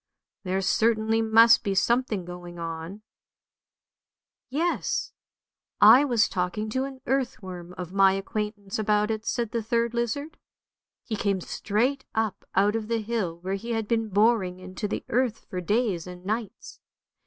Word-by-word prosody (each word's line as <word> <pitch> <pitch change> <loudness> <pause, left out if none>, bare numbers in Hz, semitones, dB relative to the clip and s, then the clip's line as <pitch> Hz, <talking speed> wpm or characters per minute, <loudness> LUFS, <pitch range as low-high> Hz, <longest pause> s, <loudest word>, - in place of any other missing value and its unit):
There 190 0 -1
certainly 220 +2 +2
must 225 +1 +6
be 200 -3 -1
something 230 -3 +1
going 175 0 -9
on." 165 +4 -6 0.7
" - - -67
Yes, 325 +7 -1 0.7
I 275 +3 +8
was 235 -6 +3
talking 200 +4 -2
to 260 +3 0
an 265 -1 -9
earthworm 185 -9 -3
of 180 0 -6
my 195 -1 +5
acquaintance 205 +1 -4
about 210 0 +2
it," 220 0 -4
said 235 -3 -1
the 230 - -1
third 235 +1 0
lizard. 240 +6 -3 0.3
" - - -67
He 220 - -2
came 200 -2 0
straight 240 +9 -1
up 220 -2 -1
out 205 +3 +3
of 220 -1 -3
the 230 -1 0
hill, 205 -7 -2
where 190 +2 -3
he 230 +4 -3
had 225 -2 -2
been 225 -1 0
boring 205 -3 +2
into 185 +3 -5
the - - -4
earth 245 -2 0
for 180 - -4
days 205 -3 0
and 180 0 -10
nights. 215 0 -4
215 Hz, 155 wpm, -26 LUFS, 190-235 Hz, 0.7 s, I